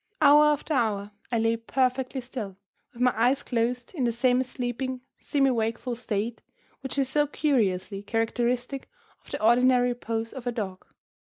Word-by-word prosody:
Hour 295 Hz, +1 st, +7 dB
after 300 Hz, +1 st, +1 dB
hour 210 Hz, -5 st, 0 dB, 0.2 s
I 235 Hz, -, +2 dB
lay 225 Hz, 0 st, +2 dB
perfectly 255 Hz, +2 st, 0 dB
still, 235 Hz, -6 st, -6 dB, 0.3 s
with 240 Hz, -, -3 dB
my 250 Hz, -, +4 dB
eyes 245 Hz, +5 st, +2 dB
closed, 240 Hz, +2 st, -1 dB
in 290 Hz, -8 st, -2 dB
the 240 Hz, -, +2 dB
semi 250 Hz, +2 st, +2 dB
sleeping, 255 Hz, 0 st, -4 dB
semi 275 Hz, -2 st, +1 dB
wakeful 230 Hz, +1 st, -1 dB
state 230 Hz, -1 st, -3 dB, 0.4 s
which 265 Hz, +1 st, -5 dB
is 275 Hz, -2 st, +2 dB
so 295 Hz, +2 st, +2 dB
curiously 205 Hz, -10 st, 0 dB
characteristic 240 Hz, +4 st, -1 dB, 0.3 s
of -, -, -18 dB
the -, -, -4 dB
ordinary 245 Hz, +2 st, +4 dB
repose 230 Hz, -2 st, -3 dB
of 255 Hz, -2 st, -7 dB
a -, -, +1 dB
dog. 195 Hz, -6 st, -5 dB
245 Hz, 160 wpm, -27 LUFS, 225-260 Hz, 0.4 s, Hour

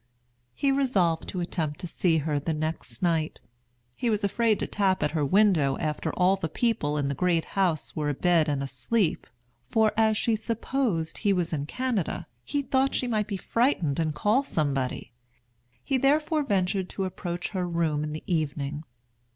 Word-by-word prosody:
He 275 Hz, -, +2 dB
resolved 200 Hz, -12 st, +1 dB
to 180 Hz, -, -3 dB
attempt 160 Hz, -4 st, -2 dB
to 180 Hz, -, -4 dB
see 165 Hz, -1 st, +1 dB
her 150 Hz, -1 st, 0 dB
the 155 Hz, +2 st, -2 dB
next 155 Hz, +4 st, -4 dB
night. 165 Hz, -3 st, 0 dB, 0.6 s
He 240 Hz, -, -1 dB
was 210 Hz, -1 st, 0 dB
afraid 220 Hz, +2 st, +2 dB
to -, -, -2 dB
tap 195 Hz, -2 st, +1 dB
at 150 Hz, -, +1 dB
her 155 Hz, -2 st, 0 dB
window 165 Hz, -5 st, +3 dB
after 150 Hz, -1 st, -2 dB
all 185 Hz, +2 st, +3 dB
the 165 Hz, -4 st, -3 dB
people 160 Hz, -8 st, 0 dB
in 145 Hz, -1 st, 0 dB
the 140 Hz, -, -1 dB
Great 170 Hz, +2 st, +1 dB
House 180 Hz, -6 st, 0 dB
were 150 Hz, -1 st, -1 dB
abed 165 Hz, +2 st, +2 dB
and 140 Hz, -2 st, -1 dB
asleep; 190 Hz, +6 st, -1 dB, 0.4 s
for, 220 Hz, -1 st, +3 dB
as 220 Hz, -1 st, +3 dB
she 230 Hz, +1 st, +1 dB
supposed 220 Hz, -6 st, -1 dB
he 205 Hz, -, +2 dB
was 175 Hz, -3 st, -1 dB
in 145 Hz, -1 st, -2 dB
Canada, 245 Hz, -4 st, -2 dB, 0.2 s
he 285 Hz, -, -2 dB
thought 265 Hz, 0 st, +1 dB
she -, -, 0 dB
might 215 Hz, -4 st, 0 dB
be 200 Hz, -, -3 dB
frightened 185 Hz, -, +1 dB
and 155 Hz, -2 st, 0 dB
call 215 Hz, -, +3 dB
somebody. 140 Hz, -, -2 dB, 0.7 s
He 265 Hz, -, 0 dB
therefore 300 Hz, +3 st, +2 dB
ventured 190 Hz, -6 st, 0 dB
to 195 Hz, -, -3 dB
approach 175 Hz, -1 st, -4 dB
her 185 Hz, -3 st, -2 dB
room 160 Hz, -3 st, 0 dB
in 150 Hz, -, -3 dB
the 155 Hz, -, -6 dB
evening. 150 Hz, -3 st, -2 dB
180 Hz, 175 wpm, -27 LUFS, 155-220 Hz, 0.7 s, window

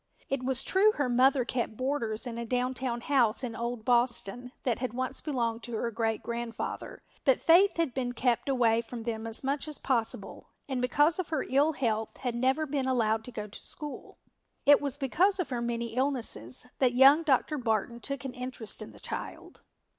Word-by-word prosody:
It 275 Hz, -1 st, -1 dB
was 260 Hz, 0 st, +1 dB
true 415 Hz, +3 st, +4 dB
her 285 Hz, -8 st, 0 dB
mother 255 Hz, +1 st, +4 dB
kept 235 Hz, -3 st, -2 dB
boarders 255 Hz, -4 st, -2 dB
in 235 Hz, -1 st, -5 dB
a -, -, -2 dB
downtown 250 Hz, 0 st, -1 dB
house 250 Hz, -4 st, +2 dB
in 235 Hz, -3 st, -4 dB
old 235 Hz, -1 st, -4 dB
Boston 245 Hz, -1 st, +1 dB
that 245 Hz, -4 st, 0 dB
had 250 Hz, -2 st, -3 dB
once 260 Hz, +1 st, -2 dB
belonged 235 Hz, -6 st, -1 dB
to 240 Hz, -, -8 dB
her 235 Hz, +2 st, -1 dB
great 225 Hz, -1 st, -1 dB
grandfather, 235 Hz, -1 st, -5 dB, 0.2 s
but 265 Hz, -3 st, +4 dB
Faith 360 Hz, +4 st, +5 dB
had 330 Hz, -7 st, 0 dB
been 245 Hz, -1 st, -2 dB
kept 245 Hz, +2 st, 0 dB
away 235 Hz, -4 st, +3 dB
from 235 Hz, 0 st, -8 dB
them 225 Hz, -1 st, -3 dB
as 225 Hz, +4 st, 0 dB
much 275 Hz, +2 st, -1 dB
as 300 Hz, -, -3 dB
possible 235 Hz, -4 st, -2 dB, 0.2 s
and 260 Hz, -3 st, -2 dB
because 290 Hz, +7 st, +3 dB
of 365 Hz, -, -2 dB
her 315 Hz, -, 0 dB
ill 285 Hz, +4 st, +3 dB
health 220 Hz, -5 st, -1 dB
had 245 Hz, -2 st, -2 dB
never 260 Hz, +6 st, +1 dB
been 275 Hz, -2 st, -1 dB
allowed 225 Hz, -4 st, +1 dB
to 250 Hz, -, -7 dB
go 215 Hz, -3 st, -5 dB
to 210 Hz, -, -11 dB
school. 295 Hz, -2 st, -8 dB, 0.5 s
It 290 Hz, 0 st, +7 dB
was 285 Hz, -1 st, 0 dB
because 360 Hz, +8 st, +2 dB
of 355 Hz, -, -1 dB
her 240 Hz, -1 st, -1 dB
many 235 Hz, -1 st, -2 dB
illnesses 250 Hz, -, -1 dB
that 250 Hz, -2 st, +3 dB
young 275 Hz, +5 st, +7 dB
Dr. 300 Hz, 0 st, +1 dB
Barton 235 Hz, 0 st, -1 dB
took 275 Hz, +2 st, -5 dB
an 260 Hz, -, -4 dB
interest 250 Hz, -3 st, -6 dB
in -, -, -8 dB
the -, -, -15 dB
child. -, -, -7 dB
250 Hz, 195 wpm, -29 LUFS, 235-275 Hz, 0.5 s, It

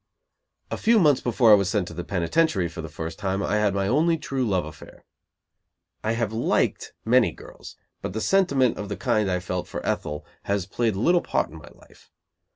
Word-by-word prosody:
A -, -, -2 dB
few 230 Hz, +1 st, +3 dB
months 150 Hz, -9 st, +4 dB
before 120 Hz, -1 st, +3 dB
I -, -, +10 dB
was 100 Hz, -2 st, +4 dB
sent 100 Hz, -3 st, 0 dB
to -, -, -9 dB
the 90 Hz, -, -5 dB
penitentiary 100 Hz, -, +1 dB
for 85 Hz, 0 st, -7 dB
the 80 Hz, -, -7 dB
first 80 Hz, +3 st, -6 dB
time, 95 Hz, -1 st, -1 dB
I 105 Hz, -, 0 dB
had 105 Hz, -2 st, +1 dB
my 100 Hz, 0 st, 0 dB
only 160 Hz, +8 st, +2 dB
true 135 Hz, -4 st, -3 dB
love 95 Hz, -8 st, 0 dB
affair. 75 Hz, -, -13 dB, 1.0 s
I 110 Hz, -, 0 dB
have 115 Hz, -2 st, -2 dB
liked 115 Hz, -, 0 dB
many 125 Hz, +1 st, +4 dB
girls, -, -, -12 dB, 0.3 s
but 105 Hz, +5 st, -4 dB
sentiment 140 Hz, -, +2 dB
of 105 Hz, -, -5 dB
the 100 Hz, -, -4 dB
kind 110 Hz, -6 st, +1 dB
I 90 Hz, -1 st, 0 dB
felt 90 Hz, -1 st, -4 dB
for -, -, -6 dB
Ethel 75 Hz, 0 st, -3 dB, 0.2 s
has 100 Hz, -2 st, -1 dB
played 110 Hz, +2 st, -1 dB
little 170 Hz, -, +3 dB
part -, -, -1 dB
in 80 Hz, -, -10 dB
my 75 Hz, -, -13 dB
life. -, -, -21 dB
105 Hz, 200 wpm, -24 LUFS, 90-125 Hz, 1.0 s, I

